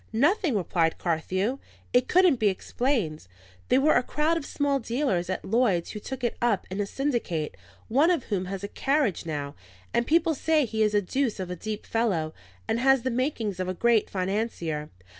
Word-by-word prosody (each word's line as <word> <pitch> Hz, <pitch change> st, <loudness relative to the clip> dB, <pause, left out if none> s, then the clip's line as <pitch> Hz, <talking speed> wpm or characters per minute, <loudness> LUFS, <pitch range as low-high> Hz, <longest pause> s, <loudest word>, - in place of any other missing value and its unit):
"Nothing," 300 Hz, -, +2 dB
replied 165 Hz, -3 st, +1 dB
Carthew. 185 Hz, +9 st, -1 dB, 0.3 s
"It 245 Hz, 0 st, +4 dB
couldn't 360 Hz, -6 st, +5 dB
be 220 Hz, -, +2 dB
explained. 195 Hz, -, -1 dB, 0.4 s
They 255 Hz, -, +5 dB
were 290 Hz, +3 st, +4 dB
a -, -, +4 dB
crowd 300 Hz, +5 st, 0 dB
of 325 Hz, -4 st, -3 dB
small 285 Hz, -1 st, 0 dB
dealers 230 Hz, -7 st, -1 dB
at 185 Hz, -, -3 dB
Lloyd's 210 Hz, -6 st, +1 dB
who 210 Hz, -, -6 dB
took 265 Hz, +4 st, -7 dB
it 240 Hz, -, 0 dB
up 235 Hz, -5 st, +1 dB
in 200 Hz, +2 st, -1 dB
syndicate; 230 Hz, -, -2 dB, 0.3 s
one 280 Hz, +9 st, +4 dB
of 345 Hz, -8 st, 0 dB
them 190 Hz, -4 st, -1 dB
has 195 Hz, +1 st, -5 dB
a -, -, -2 dB
carriage 270 Hz, -, 0 dB
now; 145 Hz, -2 st, -3 dB, 0.4 s
and 235 Hz, -, +1 dB
people 330 Hz, +1 st, +3 dB
say 310 Hz, 0 st, +2 dB
he 220 Hz, -1 st, -2 dB
is 210 Hz, -1 st, +3 dB
a 205 Hz, -, +3 dB
deuce 255 Hz, +2 st, -1 dB
of 185 Hz, -1 st, -4 dB
a -, -, -3 dB
deep 215 Hz, +4 st, -5 dB
fellow, 185 Hz, -9 st, 0 dB, 0.3 s
and 230 Hz, -, 0 dB
has 270 Hz, -1 st, +4 dB
the 260 Hz, -, 0 dB
makings 235 Hz, -6 st, -1 dB
of 185 Hz, -, -1 dB
a 185 Hz, -, -2 dB
great 235 Hz, +1 st, +3 dB
financier. 185 Hz, -6 st, -2 dB
225 Hz, 190 wpm, -27 LUFS, 185-270 Hz, 0.4 s, couldn't